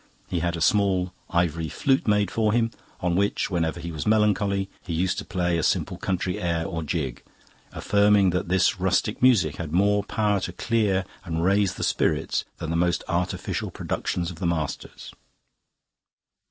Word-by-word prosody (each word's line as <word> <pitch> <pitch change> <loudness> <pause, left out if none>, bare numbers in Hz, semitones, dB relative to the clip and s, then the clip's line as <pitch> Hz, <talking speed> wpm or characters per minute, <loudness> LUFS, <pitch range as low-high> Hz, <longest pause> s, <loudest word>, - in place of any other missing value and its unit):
He 90 - -1
had 85 +1 -1
a - - -6
small 95 -1 +2 0.2
ivory 85 -3 0
flute 135 -4 +1
made 105 -2 +2
for 110 -2 +1
him, 115 -1 +2 0.3
on 90 -1 +1
which, 100 +1 0
whenever 85 -1 -1
he 85 0 -5
was 80 +2 -5
melancholy, 105 -2 +2 0.2
he 85 - -5
used 90 +3 0
to - - -6
play 90 -2 0
a - - 0
simple - - 0
country 90 -1 -2
air 85 -2 0
or 85 -4 -3
jig, 75 -5 -3 0.5
affirming 100 -2 +3
that 90 +1 -1
this 95 0 +2
rustic 95 +3 0
music 110 - +4
had 80 -3 -5
more 100 +4 +3
power 105 -1 0
to 90 - -5
clear 100 -3 +1 0.2
and 85 -3 -2
raise 100 -1 +2
the - - -4
spirits - - 0
than 80 - -4
the - - -1
most 85 +1 +1
artificial 90 +1 -2
productions 85 0 -3
of 85 - -10
the 85 - -1
masters. 80 -4 -4
90 Hz, 170 wpm, -25 LUFS, 85-100 Hz, 0.5 s, music